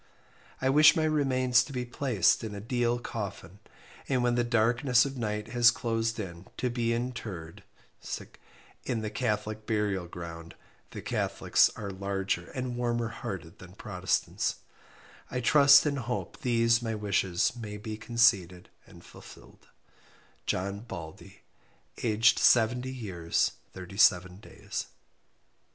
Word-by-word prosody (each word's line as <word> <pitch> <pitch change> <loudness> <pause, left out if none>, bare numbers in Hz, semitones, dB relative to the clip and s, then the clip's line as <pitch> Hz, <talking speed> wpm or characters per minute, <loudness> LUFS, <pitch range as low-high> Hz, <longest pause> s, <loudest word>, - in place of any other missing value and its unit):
I 130 - 0
wish 150 +2 +7
my 160 - +1
remains 130 -5 +2
to 140 - -10
be 125 -2 -3
placed 120 -7 +1
in 110 -2 -5
a - - -5
deal 120 +2 0
coffin, 100 -5 -7 0.5
and 130 -3 +1
when 120 0 +2
the 120 0 +1
darkness 120 +2 +3
of 140 0 -5
night 105 -3 -3
has 120 -2 +5
closed 115 -1 -1
in 85 -3 -7
to 125 - -1
be 120 -1 -1
intered 105 -8 -5 1.2
in 115 -3 -2
the 110 -1 -4
catholic 110 -1 -2
burial 105 -5 -1
ground 85 -1 -9 0.3
the - - -8
catholics - - +2
are 100 -2 -5
larger 95 -2 -3
and 125 -2 -3
warmer 120 -1 -1
hearted 90 -3 -7
than 90 -1 -13
protestants, 95 -2 -2 0.7
I 125 - -2
trust 140 +3 +6
and 140 -2 0
hope 120 0 -4
these 115 -3 +2
my 115 -1 -3
wishes 100 -2 0
may 105 -3 -7
be 110 +1 -6
conceded 110 -6 +1 0.2
and - - -16
fulfill'd - - -15 0.8
"JOHN 100 +2 -2
BALDEY 85 -8 -10 0.6
"aged 115 0 +3
70 125 +2 +3
years 95 -10 -1 0.2
37 90 -1 +2
days." 100 - -7
115 Hz, 130 wpm, -29 LUFS, 100-125 Hz, 1.2 s, wish